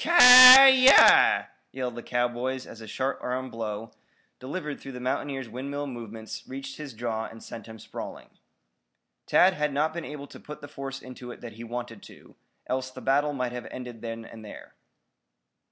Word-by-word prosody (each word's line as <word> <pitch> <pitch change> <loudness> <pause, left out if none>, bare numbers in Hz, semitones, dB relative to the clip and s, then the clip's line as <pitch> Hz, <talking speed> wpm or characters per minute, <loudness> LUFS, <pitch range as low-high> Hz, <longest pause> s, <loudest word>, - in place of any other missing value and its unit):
"Ki - - -5
yi!" 260 -3 +9 0.8
yelled 125 -2 -5
the 120 - -9
cowboys 125 +2 -3
as 115 - -13
a 110 - -11
short 130 +5 -4
arm 130 +1 -5
blow, 110 -1 -7 0.5
delivered 150 +2 -7
through 135 - -11
the 125 - -9
mountaineer's 135 +1 -4
windmill 140 +5 -6
movements, 115 -4 -9
reached 135 0 -9
his 150 -4 -9
jaw 110 -1 -4
and 115 0 -13
sent 115 - -11
him 110 0 -12
sprawling. - - -10 1.0
Tad 185 +1 +3
had 150 -3 -3
not 150 +3 -1
been 170 -1 -6
able 145 -2 -9
to - - -15
put 150 0 -11
the 145 - -11
force 135 -2 -9
into 125 -1 -11
it 120 - -11
that 120 - -10
he 115 +2 -11
wanted 120 -2 -8
to, - - -17 0.3
else 130 0 -4
the 130 - -12
battle 145 +3 0
might 125 -3 -4
have 125 0 -8
ended 125 -3 -10
then 115 -1 -8
and 110 -1 -13
there. 105 - -13
130 Hz, 180 wpm, -25 LUFS, 115-145 Hz, 1.0 s, yi